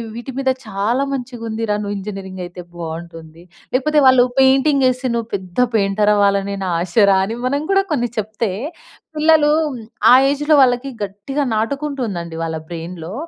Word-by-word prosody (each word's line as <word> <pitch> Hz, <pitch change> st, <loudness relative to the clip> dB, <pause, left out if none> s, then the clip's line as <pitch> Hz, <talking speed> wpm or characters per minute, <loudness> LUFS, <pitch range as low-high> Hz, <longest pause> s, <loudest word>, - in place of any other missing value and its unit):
వీటి 240 Hz, +3 st, -6 dB
మీద 265 Hz, -1 st, +1 dB, 0.2 s
చాలా 215 Hz, +6 st, 0 dB
మంచిగుందిరా, 230 Hz, -4 st, -3 dB
నువ్వు 205 Hz, 0 st, -3 dB
ఇంజనీరింగయితే 190 Hz, -3 st, -7 dB, 0.2 s
బావుంటుంది. 165 Hz, 0 st, -8 dB, 0.3 s
లేకపోతే, 300 Hz, +4 st, +2 dB
వాళ్ళు 255 Hz, -1 st, +6 dB, 0.2 s
పెయింటింగేసి 265 Hz, -1 st, +3 dB
నువ్వు 230 Hz, -1 st, -2 dB
పెద్ద 185 Hz, +1 st, -6 dB, 0.2 s
పెయింటరవ్వాలని 200 Hz, -1 st, +2 dB
నా 180 Hz, -, -1 dB
ఆశరా 195 Hz, +2 st, +3 dB
అని 225 Hz, +4 st, -5 dB
మనం 280 Hz, +3 st, 0 dB
గూడా 390 Hz, 0 st, +4 dB
కొన్ని 240 Hz, -4 st, 0 dB
చెప్తే, 215 Hz, 0 st, -2 dB, 0.7 s
పిల్లలూ 310 Hz, -1 st, +4 dB, 0.6 s
ఆ -, -, +8 dB, 0.2 s
ఏజ్‌లో 295 Hz, +2 st, +2 dB
వాళ్ళకి 255 Hz, 0 st, +3 dB
గట్టిగా 205 Hz, +9 st, -3 dB
నాటుకుంటుందండి 225 Hz, -, -3 dB
వాళ్ళ 165 Hz, -1 st, -3 dB
బ్రెయిన్‌లో. 170 Hz, +1 st, -7 dB
215 Hz, 125 wpm, -19 LUFS, 190-265 Hz, 0.7 s, ఆ